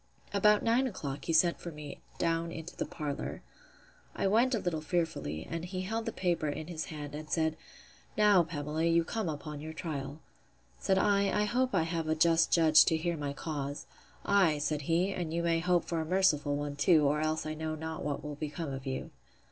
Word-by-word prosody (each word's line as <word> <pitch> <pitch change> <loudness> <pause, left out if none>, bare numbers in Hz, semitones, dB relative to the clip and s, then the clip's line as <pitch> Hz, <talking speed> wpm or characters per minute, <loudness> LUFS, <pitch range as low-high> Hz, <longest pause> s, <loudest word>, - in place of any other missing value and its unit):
About 210 +1 +4
nine 240 +3 +3
o'clock 145 - -5
he - - -1
sent 170 +2 +4
for 170 - -6
me 150 -2 -9 0.2
down 165 0 0
into 165 +1 -7
the - - -3
parlour. 145 -3 -5 0.7
I - - -1
went 235 +6 +3
a - - 0
little 170 -5 -2
fearfully; 155 - -2
and 165 0 -4
he 185 +1 -4
held 225 +4 -3
the - - 0
paper 175 -4 0
in 155 +2 -4
his 160 -1 -5
hand, 150 -2 -7
and 155 +1 -7
said, 160 -1 +1 0.6
Now, 210 -3 +6
Pamela, 155 -1 -2
you 170 0 +4
come 220 0 -2
upon 150 -1 -6
your 160 +1 -6
trial. 145 -3 -5 0.6
Said 190 - +2
I, 200 0 +3
I 210 - +1
hope 250 +2 +1
I 170 - +3
have 165 -1 -2
a 155 - +1
just 165 +1 +3
judge 160 -2 +7
to 160 - +2
hear 170 +2 -1
my 145 -2 -3
cause. 145 -2 -4 0.4
Ay, 185 -7 +4
said 150 0 -1
he, 180 +4 +2
and 175 -4 -3
you 170 - 0
may 165 -1 +2
hope 175 0 +2
for 165 -2 -1
a - - -1
merciful 155 -5 +2
one 145 0 -3
too, 150 +1 +4
or 145 +2 +2
else 155 0 -1
I 155 - -3
know 155 0 -3
not 160 +1 -5
what 145 -1 -3
will 150 0 -5
become 150 -1 -4
of 135 0 -6
you. 130 0 -4
160 Hz, 210 wpm, -31 LUFS, 150-180 Hz, 0.7 s, judge